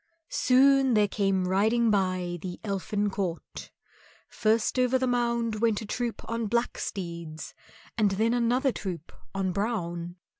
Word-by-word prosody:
Soon 265 0 +4
there 210 -1 +4
came 195 -2 0
riding 220 +5 +2
by 185 -3 0
the 180 0 -6
Elfin 205 0 -1
court, 185 -4 -4 0.6
first 225 +3 +1
over 250 +1 +3
the 260 - 0
mound 235 -2 0
went 225 -3 +2
a 220 - -6
troop 235 +2 -4
on 230 -1 -2
black 235 +3 -1
steeds, 170 -4 -6 0.5
and 210 -2 +4
then 220 +4 +1
another 245 +3 +2
troop 180 -8 -6 0.2
on 190 -1 0
brown. 175 -4 -3
210 Hz, 140 wpm, -27 LUFS, 185-235 Hz, 0.6 s, Soon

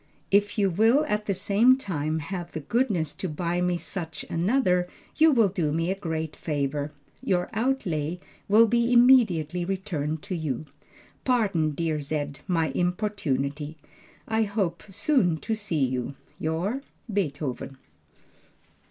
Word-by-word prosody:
If 205 +2 +3
you 200 -2 +3
will 225 - +4
at 210 -4 -1
the 200 - +2
same 210 +7 +4
time 160 - -2
have 175 +2 -5
the - - -3
goodness 185 - 0
to 185 - -4
buy 170 +3 -1
me 180 -1 +1
such 165 -4 -6
another 180 -1 +2 0.3
you 320 0 +6
will 230 -6 +5
do 170 -5 -1
me 165 +3 0
a - - 0
great 160 -5 -4
favor. 145 -1 -2 0.3
Your 180 -2 0
outlay 180 - -1 0.3
will 220 +3 +7
be 235 +1 +2
immediately 215 - +5
returned 160 -5 -3
to 200 -2 -4
you. 155 -4 -3 0.6
Pardon 195 - +1
dear 160 -2 -1
Z 145 0 -2
my 165 -4 +1
importunity. 160 -6 -1 0.5
I 220 0 +1
hope 200 -5 -1
soon 200 - +2
to 225 - -3
see 195 -10 0
you. 130 +1 -3 0.2
Your, 175 - -1 0.3
BTHVN. 145 -8 -2
180 Hz, 135 wpm, -26 LUFS, 155-210 Hz, 0.6 s, will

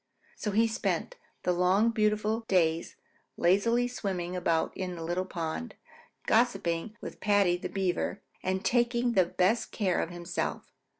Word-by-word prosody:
So 210 - -3
he 220 +3 +3
spent 225 - -2 0.3
the 180 - +2
long 185 +6 +3
beautiful 215 0 +1
days 165 -3 +1 0.4
lazily 230 +7 +3
swimming 185 -7 -3
about 165 -2 0
in 180 -1 -4
the 165 - -6
little 175 +3 -1
pond, 170 +6 -4 0.5
gossiping 210 -3 +1
with - - -8
Paddy 205 -4 +3
the 175 - -5
Beaver, 190 +1 -1 0.2
and 190 +1 -2
taking 240 0 +2
the 190 -6 +4
best 185 +6 +1
of - - -24
care 190 -5 +1
of - - -3
himself. 175 0 -4
190 Hz, 145 wpm, -29 LUFS, 175-225 Hz, 0.5 s, the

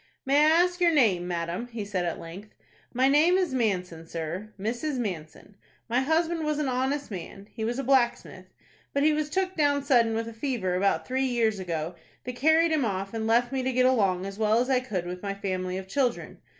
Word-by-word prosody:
"May 275 +2 +3
I 305 +1 +6
ask 360 0 -3
your 345 - +5
name, 205 - +3
madam?" 175 +5 -3
he 225 -4 -6
said 190 -3 -2
at 170 - -2
length. 185 +6 -10 0.4
"My 255 +2 +2
name 310 +6 +4
is 360 -7 0
Manson, 180 -9 -1
sir, 170 +6 -5
Mrs. 240 +8 -2
Manson. 185 -5 -6 0.3
My 240 +2 +1
husband 320 +4 0
was 305 -1 -1
an 300 -2 -1
honest 265 +1 -1
man,—he 200 +4 -8
was 235 +3 -1
a 275 - -2
blacksmith,—but 265 +2 -1
he 305 0 +4
was 300 0 -1
took 375 +3 -1
down 285 -2 +2
sudden 235 -5 +3
with 225 0 -2
a 230 - -7
fever 225 -6 -2
about 195 +2 +1
three 260 +1 0
years 225 -4 +1
ago, 170 -2 -3 0.3
that 250 0 -6
carried 315 +5 +3
him 310 -3 +2
off, 195 -2 -3
and 220 -1 -2
left 240 +2 +2
me 265 -1 -1
to 260 +1 -1
get 255 0 +2
along 195 -8 +2
as 195 +1 -7
well 215 0 +3
as 250 +2 0
I 255 - +4
could 200 -9 -4
with 180 +1 -6
my 200 -1 -3
family 185 -2 -3
of 190 0 -7
children. 245 +3 -1
235 Hz, 210 wpm, -27 LUFS, 190-275 Hz, 0.4 s, I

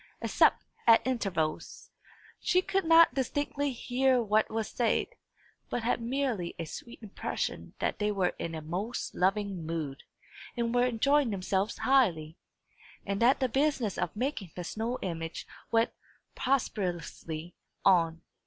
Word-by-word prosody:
Except - - +3 0.2
at 230 -1 +7
intervals, 190 -11 -2 0.5
she 365 +1 +2
could 390 -1 0
not 330 -3 +7
distinctly 285 +2 -1
hear 255 +1 +2
what 215 -1 +2
was 220 -1 -2
said, 235 - 0 0.6
but 240 - -2
had 235 0 0
merely 235 -7 -1
a 165 - -4
sweet 235 +8 -9
impression 205 - -4
that - - -2
they 210 0 +1
were 195 -3 +1
in 165 -1 -3
a 160 - -6
most 190 +10 -3
loving 195 -1 0
mood, 155 -4 -4 0.6
and 235 0 0
were 245 0 +4
enjoying 275 +3 +2
themselves 195 +1 -1
highly, 175 - +2 0.7
and 200 +1 -2
that 245 +3 +5
the 260 - +2
business 265 -5 +1
of 170 - -2
making 240 - -2
the 180 - -4
snow 225 +7 -3
image 165 -2 -4 0.2
went 225 0 +2 0.4
prosperously 175 - -2 0.3
on. 165 -4 +4
220 Hz, 135 wpm, -30 LUFS, 180-255 Hz, 0.7 s, at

